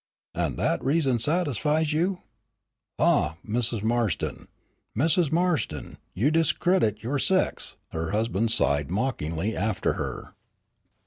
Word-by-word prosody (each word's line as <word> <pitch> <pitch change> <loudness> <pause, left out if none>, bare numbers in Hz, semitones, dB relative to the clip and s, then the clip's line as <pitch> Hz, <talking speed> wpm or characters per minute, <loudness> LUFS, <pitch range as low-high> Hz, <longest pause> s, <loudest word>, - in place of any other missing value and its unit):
"And - - -2
that - - 0
reason 135 -3 +2
satisfies 150 - +1
you? 180 +4 0 0.7
Ah, 80 - +2
Mrs. 115 -1 0
Marston, 115 -5 -1 0.5
Mrs. 160 +3 +3
Marston, 160 - -1 0.2
you 125 +11 +2
discredit 160 - +2
your 135 +5 -1
sex!" 185 +6 +1
her 80 0 -3
husband 110 +1 0
sighed, 70 - +1
mockingly 100 - -2
after 105 +1 0
her. - - -5
120 Hz, 110 wpm, -26 LUFS, 105-160 Hz, 0.7 s, Mrs